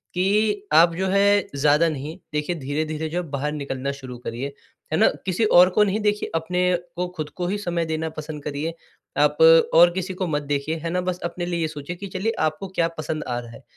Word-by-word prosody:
कि 205 +2 +1
आप 170 +2 +6
जो 190 +2 -1
है 200 +1 +3
ज़्यादा 150 +3 +4
नहीं 150 +2 -5 0.2
देखिए 150 +4 -1
धीरे-धीरे 155 +2 -3
जो 175 +2 -1
है 165 - -10
बाहर 140 +1 -2
निकलना 140 -2 -3
शुरू 130 -3 -8
करिए, 125 +4 -5 0.4
है - - +3
ना? 220 - +6 0.2
किसी 190 +4 +1
और 180 -3 +7
को 210 +3 +3
नहीं 205 +1 0
देखिए 210 0 0
अपने 180 +3 -1 0.3
को 180 +1 -1
ख़ुद 155 -1 -3
को 175 -1 -1
ही 200 - -1
समय 175 -4 -2
देना 160 0 -2
पसंद 150 -1 -7
करिए 150 +3 -3 0.4
आप 150 0 +3 0.4
और 175 +1 +8
किसी 185 +1 -3
को 185 0 -3
मत 150 -2 -1
देखिए 145 +2 -1
है 165 - -2
ना 180 +1 0
बस 180 0 -3
अपने 175 0 -3
लिए 175 -1 -2
ये 160 - +1
सोचिए 155 +2 -6
कि 200 +3 -7
चलिए 210 +4 -2 0.2
आपको 175 +6 -8
क्या 165 -1 +3
पसंद 155 0 -3
आ 120 -1 -2
रहा 120 -1 -10
है। 125 - -13
165 Hz, 220 wpm, -23 LUFS, 150-180 Hz, 0.4 s, और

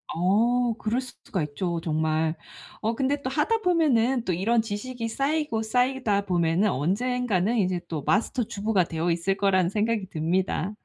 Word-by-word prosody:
어. 230 +7 +2
그럴 230 +4 -1
숫 255 -1 -10 0.2
가 185 - 0
있죠 170 +4 -3
정말. 155 0 0 0.5
어 225 +2 0
근데 280 +2 0
또 260 - -1
하다 320 +11 +1
보면은 270 - +2
또 180 - 0
이런 225 +6 +2
지식이 230 +2 -4
쌓이고 275 -2 -1
쌓이다 245 -3 +1
보면은 175 +2 +2
언젠가는 215 - 0
이제 185 -3 +1
또 155 -4 -4
마스터 230 - +1
주부가 205 -2 0
되어있을 170 +4 -1
거라는 190 -3 +2
생각이 210 -1 -1
듭니다. 180 +4 -1
210 Hz, 325 characters per minute, -26 LUFS, 175-245 Hz, 0.5 s, 어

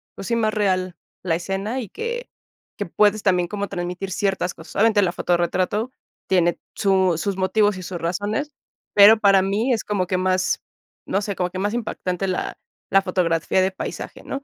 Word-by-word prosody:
pues 195 - -7
sí, 235 - +1
más 220 -2 +1
real 185 -4 0 0.3
la 170 -3 +1
escena 195 +8 -3
y 225 -6 -6
que 475 +2 -5 0.5
que - - -2
puedes 210 0 +2
también 180 -3 +2
como 200 +2 -3
transmitir 180 +2 -4
ciertas 190 -1 -1
cosas. 160 0 -13
Obviamente, 220 0 +4
la 185 -3 +2
foto 175 - -1
de - - +4
retrato 185 +7 0 0.4
tiene 175 -2 +2 0.2
su 190 -3 +2
sus 195 +4 -2
motivos 205 +1 +2
y 185 - -7
sus 175 0 -5
razones, 205 - -2 0.4
pero 205 +2 +8
para 195 -2 +5
mí 210 +7 +1
es 225 - -1
como 200 -3 -1
que 185 - 0
más, 185 0 +1 0.5
no 195 - 0
sé, 200 -1 -3
como 180 0 -1
que 185 +1 -6
más 205 +2 -1
impactante 195 -5 -2
la 185 - -2 0.3
la 195 0 +5
fotografía 180 -1 +1
de 190 +1 +1
paisaje, 190 - -6
¿no? 275 0 -5
195 Hz, 190 wpm, -22 LUFS, 180-210 Hz, 0.5 s, pero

